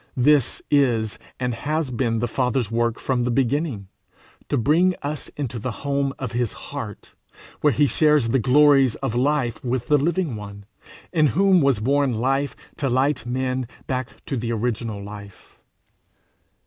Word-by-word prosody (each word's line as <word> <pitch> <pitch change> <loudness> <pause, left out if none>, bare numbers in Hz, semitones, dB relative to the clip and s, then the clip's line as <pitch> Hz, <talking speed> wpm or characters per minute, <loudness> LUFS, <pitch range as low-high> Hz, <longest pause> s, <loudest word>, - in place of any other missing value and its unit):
This 140 0 +3
is 120 -7 +2 0.2
and 125 -1 -1
has 150 +3 -2
been 115 -2 0
the 120 +2 0
Father's 125 -2 -1
work 115 0 0
from 125 -2 0
the 125 - 0
beginning 130 - 0 0.6
to 145 - +1
bring 165 +9 +3
us 145 +1 -4
into 125 -5 -3
the 125 - -3 0.2
home 140 -1 0
of 125 -4 -4
his 120 -2 -1
heart, 115 -8 -8 0.5
where 150 - +3
he 145 +4 +3
shares 150 -4 +3
the 135 - +2
glories 135 0 +5
of 135 -5 -3
life 130 -2 0
with 125 -1 -2
the 150 -1 +5
Living 165 -2 0
One, 100 -1 -9 0.5
in 155 -3 +4
whom 185 - +4
was 135 -6 +3
born 135 +2 +1
life 135 +5 0 0.2
to 140 -5 -1
light 130 -1 +1
men 130 0 -1 0.2
back 130 -1 -2 0.2
to 135 - -3
the 115 0 -2
original 115 -2 -2
life. 100 -1 -11
130 Hz, 160 wpm, -23 LUFS, 115-145 Hz, 0.6 s, glories